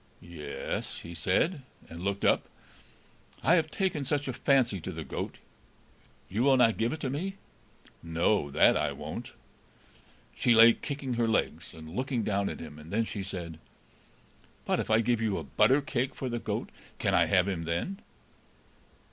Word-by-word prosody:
"Ye 85 -4 -10
es," - - -4
he 85 - -9
said, 115 - +1 0.3
and 85 +1 -9
looked 100 0 -1
up. - - +4 1.0
"I 165 - +5
have 160 -3 +3
taken 175 -5 -1
such 145 +1 -1
a 130 - -2
fancy 120 -7 +2
to 95 - -5
the 80 -2 -6
goat. - - -5 0.9
You 105 +5 -2
will 135 0 +5
not 115 -3 +4
give 115 +1 +1
it 155 - -4
to 135 - -1
me?" 190 +8 -3 0.7
"No, 85 0 +1
that - - +5
I - - 0
won't." - - -7 1.0
She 120 - +3
lay 115 +1 +9
kicking 140 -1 -4
her 120 -1 +1
legs, 110 - -1
and 80 +1 -10
looking 130 -2 -1
down 100 -1 0
at - - -6
him, 75 - -9
and 75 +2 -12
then 115 +3 +1
she 105 - -5
said, 85 -4 -6 1.1
"But - - +1
if - - -3
I 110 +1 +4
give 115 0 +1
you 110 -3 0
a 80 - -4
butter 105 - +3
cake 135 -2 -2
for 130 - -4
the 120 0 -2
goat, - - -3 0.3
can - - 0
I - - +4
have 95 -1 +3
him 85 -4 -2
then?" 85 - -2
110 Hz, 180 wpm, -29 LUFS, 85-135 Hz, 1.1 s, lay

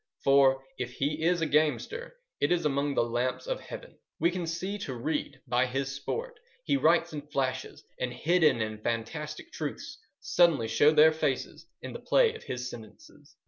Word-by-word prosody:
For, 135 -1 +5 0.2
if 125 -1 -4
he 150 +4 -1
is 170 +1 +2
a - - +2
gamester, 155 - 0 0.2
it - - +1
is 175 -3 +2
among 140 -1 0
the - - +3
lamps 120 - -1
of - - -2
Heaven. - - -10 0.2
We 170 - +3
can 175 -2 -3
see 190 +5 -3
to 130 -9 -5
read 140 +2 -3
by 125 +1 +2
his 135 +2 -2
sport. 460 - -5 0.2
He 285 - +1
writes 170 - +3
in 150 - -4
flashes, 130 -3 -3 0.2
and 125 -1 -1
hidden 155 -4 +3
and 110 0 -4
fantastic 150 - -4
truths - - -6 0.2
suddenly 165 -10 +3
show 145 - +5
their 155 +1 +7
faces 160 - -2 0.2
in - - -6
the - - -6
play 475 -3 +3
of 455 - -11
his 125 0 -4
sentences. 110 -4 -13
150 Hz, 180 wpm, -29 LUFS, 130-170 Hz, 0.2 s, their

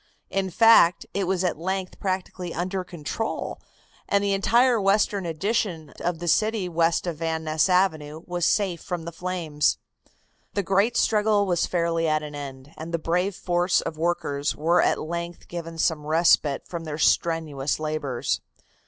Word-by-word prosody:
In 195 -1 0
fact, 225 -3 +5
it 195 -1 0
was 190 0 0
at 175 -4 -1
length 190 +1 -3
practically 185 -2 -3
under 185 +2 -2
control, 180 +5 -4 0.5
and 200 0 +2
the 200 -1 +1
entire 235 +4 +3
western 200 -1 +2
addition 170 -2 -2
of 175 -1 -1
the 175 +1 -6
city 215 +3 +2
west 165 0 +1
of 170 -3 -3
Van 160 0 -2
Ness 155 +3 +1
Avenue 160 -4 +1
was 175 -1 0
safe 190 -5 +1
from 175 -4 -5
the 170 - -5
flames. 165 -4 -1 0.8
The 200 - +1
great 200 +6 +2
struggle 210 -1 +3
was 175 -3 +1
fairly 170 -2 0
at 155 0 +1
an 150 -1 -7
end, 140 0 -8
and 160 +2 -7
the 170 - 0
brave 180 +4 0
force 175 0 +1
of 155 - -4
workers 155 -3 -1
were 165 +4 +3
at - - +2
length 170 +2 -5
given 165 -1 -6
some 155 -2 0
respite 155 -3 +3
from 170 -2 -6
their 150 -1 -4
strenuous 155 -4 +1
labors. 150 -5 -2
170 Hz, 160 wpm, -25 LUFS, 160-190 Hz, 0.8 s, fact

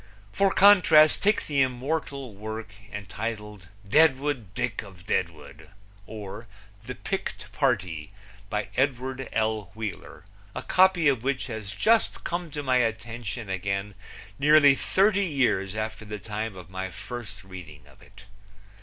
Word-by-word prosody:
For 195 0 +2
contrast, 180 -7 +6
take 210 +2 +2
the 140 -2 +1
immortal 135 0 -2
work 110 +1 -7 0.2
entitled 105 -1 -6 0.2
Deadwood 140 - +3
Dick - - -2
of 95 -3 -14
Deadwood; 80 +4 -3 0.4
or, 105 +1 -8 0.4
The 125 - -5
Picked 195 - -5
Party; 90 - -1 0.4
by 105 -1 -2
Edward 130 0 -1
L. 110 -3 -1
Wheeler, 105 -3 -7 0.3
a - - -4
copy 185 -3 +4
of 135 -5 +3
which 135 +1 -1
has 110 -5 -6
just 225 - +2
come 175 0 -3
to 145 0 -5
my 130 -2 +3
attention 115 -2 -2
again 100 +2 -2 0.5
nearly 145 0 +7
thirty 200 +7 +2
years 120 - +1
after 110 0 -4
the 105 0 -6
time 105 0 -5
of 90 -1 -11
my 95 0 -4
first 105 0 -8
reading 85 -6 -11
of - - -20
it. 95 +1 -16
115 Hz, 135 wpm, -26 LUFS, 100-140 Hz, 0.5 s, nearly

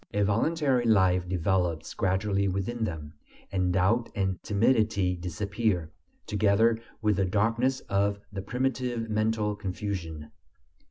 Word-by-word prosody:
A 105 - +3
voluntary 130 +5 +1
life 95 -5 +3
develops 90 -2 0
gradually 100 +1 0
within 100 +5 -2
them; 80 -5 -6 0.4
and 90 -2 +1
doubt 95 +7 +2
and 95 -3 -1
timidity 105 -4 +2
disappear, 90 0 -2 0.3
together 110 +2 +3 0.2
with 105 -2 +2
the 95 - +2
darkness 115 +7 +1
of 100 +1 0 0.2
the 95 - -3
primitive 125 0 -2
mental 110 -1 0
confusion. 90 -6 -5
100 Hz, 115 wpm, -28 LUFS, 95-110 Hz, 0.4 s, A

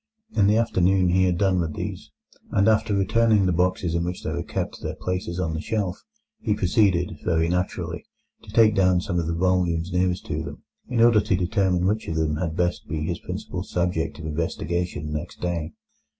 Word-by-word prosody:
In 100 -2 +4
the 105 +2 +4
afternoon 95 -5 +3
he 95 +1 +3
had 90 -2 +1
done 95 -1 +2
with 80 -3 -2
these, - - -5 0.4
and 100 - +2
after 110 -1 +3
returning 105 +1 +3
the 90 - +2
boxes 90 -1 +1
in 85 0 0
which 90 +1 -4
they - - -2
were - - -2
kept - - -3
to - - -12
their - - -3
places 90 -1 -3
on 80 -3 -1
the 80 - -3
shelf, 100 -4 -2 0.4
he 105 - 0
proceeded, 90 -4 +2
very 80 -1 +2
naturally, 90 +2 -2 0.4
to - - -16
take 110 -2 +5
down 95 -3 +3
some 85 -1 -1
of 85 - -2
the 85 - -1
volumes 90 -1 +1
nearest 90 0 0
to - - -2
them, - - -8 0.2
in 120 -2 0
order 115 -2 +6
to 95 - +1
determine 90 -1 +1
which 105 +3 0
of 80 - -2
them 80 -1 0
had 80 -1 -3
best 90 -1 -1
be 80 -2 -3
his - - -2
principal - - -5
subject 85 -2 -1
of 80 - -8
investigation 80 0 -2
next 75 - -5
day. 85 -2 -2
90 Hz, 205 wpm, -24 LUFS, 85-95 Hz, 0.4 s, order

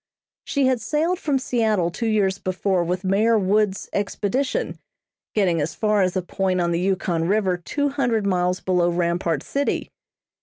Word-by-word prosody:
She 280 -2 +1
had 260 -3 +2
sailed 315 - 0
from 290 -6 0
Seattle 220 -9 0
two 230 +6 -3
years 200 -3 +1
before 185 -1 0
with 180 +2 -2
Mayor 210 +4 +3
Woods' 200 0 +1
expedition, 210 +6 -1 0.6
getting 180 -6 +2
as 155 +2 -3
far 210 -2 +2
as 185 -1 +1
a 185 - -1
point 185 0 -1
on 170 -1 +1
the 170 - 0
Yukon 180 -3 0
River 195 -2 +2
two 285 - -2
hundred 240 -7 0
miles 180 -1 +1
below 180 -2 +2
Rampart 170 -3 0
City. 280 +1 -2
195 Hz, 160 wpm, -23 LUFS, 180-225 Hz, 0.6 s, Mayor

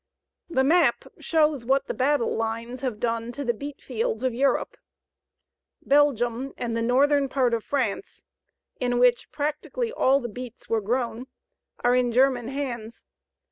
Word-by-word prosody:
The 265 -6 +2
map 335 +6 +3
shows 305 -5 +1
what 270 +3 +2
the - - -3
battle 280 -1 +1
lines 230 +2 -3
have 250 -6 -3
done 230 0 -2
to 285 +2 -5
the 240 - +1
beetfields 245 -3 -4
of 255 -2 +1
Europe. 270 +3 +1 1.1
Belgium 270 -3 +2
and 235 -2 -3
the 230 - -1
northern 275 +4 +3
part 255 -3 +1
of 230 -2 -1
France, 270 - -3 0.5
in 245 -1 0
which 245 0 +3
practically 305 +11 -3
all 275 - +3
the 240 - -4
beets 245 +1 -9
were 225 -1 0
grown, 240 +3 -2 0.6
are 245 +1 +4
in 250 -1 +2
German 250 -1 +3
hands. 245 -5 -5
250 Hz, 145 wpm, -25 LUFS, 235-275 Hz, 1.1 s, are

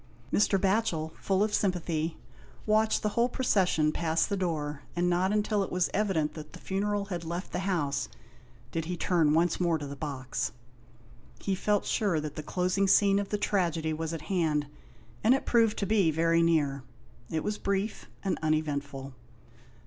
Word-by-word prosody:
Mr. 200 -1 +3
Batchel, 190 -5 +1
full 195 +1 +2
of 210 0 -1
sympathy, 170 -5 0 0.5
watched 215 0 +2
the 210 - +2
whole 235 +3 +1
procession 185 -11 +2
pass 160 0 +1
the 200 - -2
door, 150 -6 -2
and 175 +1 +1
not 180 +2 +2
until 210 0 +1
it 195 - -3
was 180 -1 +1
evident 190 -7 +1
that 150 -1 -9
the - - -10
funeral 200 +1 -1
had 170 -1 -4
left 170 +3 -5
the 180 - -2
house 145 -6 -1 0.6
did 165 -1 -2
he 180 +1 -3
turn 165 -3 +2
once 170 +2 +2
more 170 -2 +2
to 150 - -6
the 140 0 -6
box. 135 -5 -3 0.9
He 195 - -1
felt 205 +2 +1
sure 195 -7 +1
that 150 -1 -5
the 155 - -4
closing 185 +5 0
scene 200 +1 +5
of 200 - -3
the 210 - 0
tragedy 170 -6 0
was 160 +1 -3
at 165 -2 -4
hand, 155 -4 0 0.6
and 235 +5 +6
it 270 - -3
proved 225 -2 +3
to 200 - 0
be 195 -4 +3
very 165 +2 +3
near. 150 -5 +2 0.5
It 160 -1 -2
was 210 0 -2
brief 200 +2 -2
and 195 - -1
uneventful. 145 -3 -2
175 Hz, 175 wpm, -29 LUFS, 155-200 Hz, 0.9 s, and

